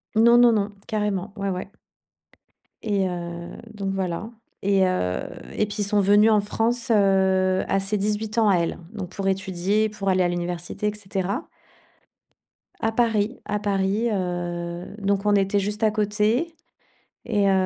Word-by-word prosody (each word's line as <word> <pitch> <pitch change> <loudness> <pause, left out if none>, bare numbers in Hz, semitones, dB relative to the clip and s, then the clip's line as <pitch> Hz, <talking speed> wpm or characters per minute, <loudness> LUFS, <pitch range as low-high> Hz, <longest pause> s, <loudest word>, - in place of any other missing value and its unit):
Non, 235 +2 +6
non, 240 -1 +7
non, 205 -1 0 0.2
carrément. 210 -2 -2
Ouais, 200 0 -2
ouais. 185 +2 -4 1.1
Et 200 -3 +1
heu, 170 -1 -5 0.2
donc 195 -2 -3
voilà, 190 +2 -3 0.3
et 195 -1 +3
heu, 90 - 0 0.3
et 215 - +1
puis 210 +1 -7
ils 205 - +2
sont 205 +1 +1
venus 205 +3 +5
en 215 - +5
France, 230 +4 -1
heu, 190 -2 +3
à 195 - +2
ses 200 +2 -1
18 210 +2 -2
ans 220 -2 +4
à 190 - +5
elle, 170 -1 -1 0.2
donc 195 -5 -5
pour 195 +1 -4
étudier, 190 +3 0
pour 205 -2 -6
aller 185 -1 +3
à 175 - +2
l'université, 175 +3 -3
et 210 - 0
cetera. 200 - -3 1.3
À 225 - 0
Paris, 225 0 +1
à 210 0 -1
Paris, 200 +3 0
heu, 175 -1 -3
donc 200 0 0
on 205 - +4
était 195 +1 +2
juste 210 +2 -2
à 215 - +4
côté, 215 +9 0 0.7
et 205 -3 +2
heu, 195 - +4
200 Hz, 165 wpm, -24 LUFS, 190-210 Hz, 1.3 s, non